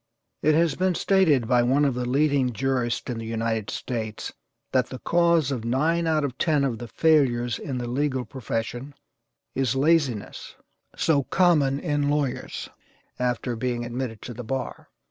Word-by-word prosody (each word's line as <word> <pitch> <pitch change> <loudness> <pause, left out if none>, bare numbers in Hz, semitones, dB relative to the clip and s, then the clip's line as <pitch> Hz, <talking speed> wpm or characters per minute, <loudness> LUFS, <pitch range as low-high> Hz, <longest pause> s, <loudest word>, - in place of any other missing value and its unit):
It 155 0 +3
has 165 0 +3
been 185 -1 0
stated 160 - +3
by 125 -1 +4
one 135 +5 +3
of 140 - +2
the 125 0 -3
leading 140 -2 +2
jurists 125 -1 -1
in 120 -2 -3
the 115 - -6
United 115 -1 -2
States 110 -4 -4 0.4
that 130 -1 +2
the 130 - -7
cause 170 -2 +2
of 125 -5 -3
nine 160 +8 +1
out 155 -2 +2
of 130 -2 -6
ten 150 -4 +2
of 120 -5 -1
the 120 - -6
failures 125 -5 +2
in 135 -3 -4
the 120 -1 -3
legal 130 0 -1
profession 120 +3 -4 0.6
is 135 -2 0
laziness, 140 -6 0 0.4
so 150 -4 +2
common 150 -7 +3
in 145 -3 0
lawyers, 145 -3 -2 0.5
after 125 0 -1
being 120 0 -2
admitted 120 -2 -5
to 120 - -6
the 125 +2 -7
bar. 130 +3 -4
130 Hz, 165 wpm, -25 LUFS, 120-150 Hz, 0.6 s, by